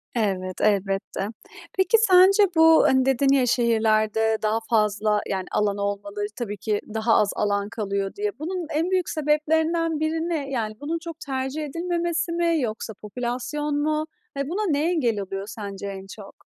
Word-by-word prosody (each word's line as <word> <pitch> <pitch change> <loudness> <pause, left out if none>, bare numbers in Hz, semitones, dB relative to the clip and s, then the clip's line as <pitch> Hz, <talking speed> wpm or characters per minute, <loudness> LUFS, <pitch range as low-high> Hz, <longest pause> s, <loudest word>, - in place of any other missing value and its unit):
Evet, 190 -5 -1
elbette. 195 -1 0 0.5
Peki 380 +4 +4
sence 390 -1 +6
bu, 320 0 +7
hani, 260 -1 +3
dedin 270 +1 +3
ya 255 -2 +3
"şehirlerde 220 -2 +2
daha 215 +1 +1
fazla 210 -1 +2
yani 190 -2 -2
alan 205 -1 +1
olmalı 205 0 -3
tabii 210 -4 -4
ki 210 +1 -1
daha 225 +1 +2
az 210 - +3
alan 205 -1 0
kalıyor" 200 -3 -3
diye. 210 +3 -3
Bunun 345 +1 -4
en 330 +5 0
büyük 365 -2 +1
sebeplerinden 315 +2 +1
biri 320 +2 -1
ne? 290 -5 -2
Yani, 225 -5 -2
bunun 320 +3 -2
çok 330 -2 -7
tercih 270 +2 -3
edilmemesi 340 +2 -2
mi 335 -2 +1
yoksa 220 -1 -4
popülasyon 250 +7 -3
mu? 310 0 0 0.3
Ya 280 - -1
buna 400 0 -1
ne 300 +4 +1
engel 240 -11 +1
oluyor 195 0 -5
sence 200 -2 -6
en 195 -1 -7
çok? 200 -2 -14
245 Hz, 160 wpm, -24 LUFS, 210-320 Hz, 0.5 s, bu